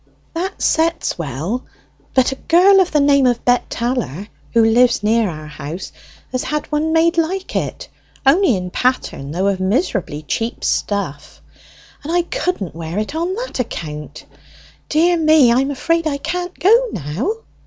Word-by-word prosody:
"That 365 +4 -4
sets 330 - +1
well, 165 - -3 0.5
but 260 0 +4
a - - -3
girl 370 +7 +5
of 370 -2 +2
the 300 - +3
name 280 -2 +4
of 240 -1 0
Bet 245 0 +2
Tallor, 230 - -3 0.2
who 230 -1 +4
lives 235 0 +3
near 220 0 +2
our 155 -2 -7
house, 150 +4 -7 0.4
has 255 - -1
had 300 0 -2
one 305 +1 0
made 335 +1 +3
almost 330 +2 +1
like 385 -1 -6
it - - -3 0.4
(only 290 - +4
in 180 -1 -4
pattern, 250 - -1
though 180 +6 -1
of 200 -1 +1
miserably 190 - -1
cheap 225 +10 -3
stuff), 185 -9 -2 0.6
and 305 - -5
I 350 0 +2
couldn't 335 - -3
wear 165 +2 -6
it 215 +6 -2
on 340 +4 -1
that - - -5
account. 150 -10 -5 0.6
Dear 340 +3 +3
me, 310 -6 +5
I 240 - +4
am 270 +1 0
afraid 330 +4 0
I 285 -2 -1
can't 355 +4 -4
go 450 - +4
now." 170 - -2
255 Hz, 165 wpm, -18 LUFS, -, 0.6 s, girl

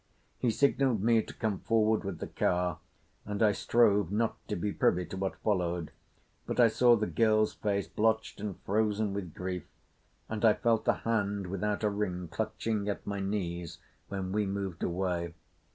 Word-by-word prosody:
He 125 - +2
signalled 130 -3 +2
me 115 0 +4
to - - -9
come 105 -4 -2
forward 110 -1 +2
with 95 -3 -4
the - - -5
car, 90 -2 0 0.4
and 105 +1 -1
I 105 - +6
strove 105 -3 +3
not 110 +2 +1
to 105 - -2
be 100 +3 -1
privy 90 0 +2
to - - -7
what 95 0 -2
followed; 90 -5 0 0.6
but - - -3
I 120 -2 +7
saw 120 +2 +5
the 110 -1 0
girl's 110 -1 +2
face, 100 -2 -1
blotched 110 -1 0
and 105 -3 -4
frozen 105 0 0
with 95 -5 -5
grief, 90 -1 -4 0.6
and 110 0 -4
I 110 -2 +6
felt 115 -2 +1
the - - +4
hand 100 -3 0
without 100 +3 -2
a 105 - +3
ring 90 -4 -3
clutching 105 +2 -2
at 100 - -4
my 100 -1 -3
knees 90 -4 -3 0.3
when 95 -2 -4
we 105 0 +1
moved 95 -3 -4
away. 85 -1 -1
100 Hz, 175 wpm, -30 LUFS, 95-110 Hz, 0.6 s, I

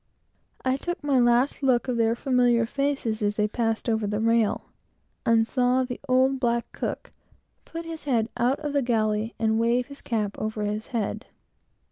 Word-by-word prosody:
I 260 +1 +2
took 350 +3 -5
my 280 -3 +3
last 240 +4 +3
look 255 -3 +2
of 250 - 0
their 230 0 +2
familiar 245 -2 +2
faces 270 -4 -1
as 205 0 0
they 210 0 +1
got 225 +1 -1
over 220 -2 +1
the 210 +1 -1
rail, 230 -1 +2 0.6
and 225 -1 +4
saw 250 +2 +2
the 250 -1 -5
old 260 +1 +3
black 235 -2 +1
cook - - -5 0.5
put 330 0 -7
his 325 -2 -7
head 235 -6 +1
out 245 +3 +1
of 295 -2 -3
the 285 - +2
galley, 220 -2 0
and 220 0 +1
wave 235 +2 +2
his 280 - -11
cap 210 -4 -2
over 215 0 -3
his 210 +1 -3
head. 230 -6 -3
235 Hz, 175 wpm, -26 LUFS, 220-260 Hz, 0.6 s, and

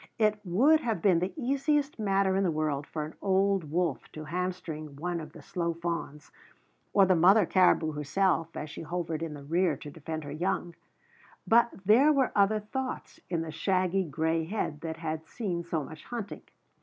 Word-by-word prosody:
It 215 -1 +2
would 250 - +4
have 230 - -1
been 180 -1 +4
the 180 +2 -1
easiest 280 0 0
matter 195 -2 +2
in 195 - +2
the 185 - +2
world 150 -2 -1
for 155 -1 -4
an 155 - -9
old 195 -3 +2
wolf 170 -3 -1
to 155 - -7
hamstring 165 -3 -4
one 170 +4 -3
of 155 - -8
the 160 - -12
slow 170 +1 -2
fawns, 170 -3 -5 0.6
or 195 - +5
the 185 -1 +4
mother 190 +5 +6
caribou 175 -3 +3
herself 165 +3 0
as 150 0 -5
she - - -7
hovered 165 -1 -3
in 160 -2 -4
the 140 - -10
rear 165 +1 +1
to 145 - -9
defend 160 +1 -6
her 145 - -7
young; 175 +2 -2 0.7
but 235 +1 +5 0.2
there 250 +9 +6
were 275 -3 +2
other 205 +1 +4
thoughts 260 +5 -5
in 165 -2 -1
the 160 - -6
shaggy 185 +3 +1
gray 160 +1 0
head 160 -5 -3
that 160 -1 -4
had 160 -1 -4
seen 180 -5 -3
so 165 -3 -2
much 155 +2 -10
hunting. 230 -4 -6
175 Hz, 185 wpm, -29 LUFS, 160-200 Hz, 0.7 s, mother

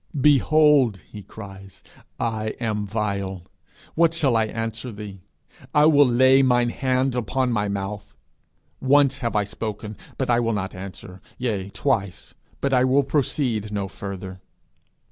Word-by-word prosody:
'Behold,' 145 -5 +4
he 105 - -8
cries, 95 -2 -12 0.4
'I 110 -1 -2
am 105 -3 -2
vile; 100 -3 -3 0.5
what 165 0 +3
shall 140 -7 +2
I 110 -1 +3
answer 115 +2 -5
thee? 100 -2 -9 0.6
I 150 0 +6
will 145 -3 +6
lay 130 +2 +5
mine 120 -2 +3
hand 130 +1 0
upon 125 +1 -1
my 105 -3 0
mouth. 100 +1 -5 0.6
Once 135 0 +3
have 115 -4 -3
I 105 - +3
spoken; 105 +1 -6 0.2
but 130 - -1
I 120 -1 +3
will 115 -1 0
not 95 -2 -3
answer: 95 0 -9 0.2
yea, 105 -6 -2
twice; 100 -4 -2 0.3
but 140 -1 0
I 125 -1 +4
will 130 +2 +3
proceed 130 -6 -1
no 100 -2 -2
further.' 95 -1 -8
115 Hz, 145 wpm, -23 LUFS, 100-130 Hz, 0.6 s, I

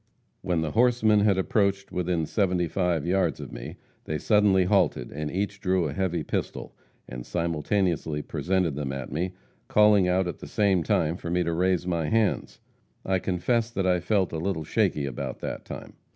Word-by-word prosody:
When 85 -2 0
the 80 -2 -2
horsemen 115 -2 +3
had 100 -2 +3
approached 100 0 0
within 90 -2 -1
seventy 90 -2 0
five 85 -2 0
yards 90 -4 +1
of - - -8
me, - - -7 0.3
they 75 - -2
suddenly 105 -1 +3
halted, 65 -8 +1
and 75 +1 -4
each 100 +2 -3
drew 95 -4 +1
a 70 - -4
heavy 90 0 -1
pistol, - - -4 0.3
and 60 0 -7
simultaneously 85 -1 -1
presented 90 -3 0
them 70 -2 -3
at 65 -1 -6
me, 90 +4 -2 0.3
calling 105 -3 +5
out 90 +1 +2
at 85 - -5
the - - -9
same 100 -4 +2
time 80 +1 +1
for 85 - -6
me 90 +1 +1
to 85 0 -1
raise 90 +1 +1
my 85 -4 -1
hands. 110 -2 0 0.5
I 95 -1 +1
confess 110 +6 0
that 100 -5 -2
I 90 -1 +3
felt 95 +1 0
a 80 - -2
little 85 -2 -2
shaky 75 -1 0
about 65 -3 -4
that - - -5
time. - - -8
90 Hz, 180 wpm, -26 LUFS, 80-100 Hz, 0.5 s, calling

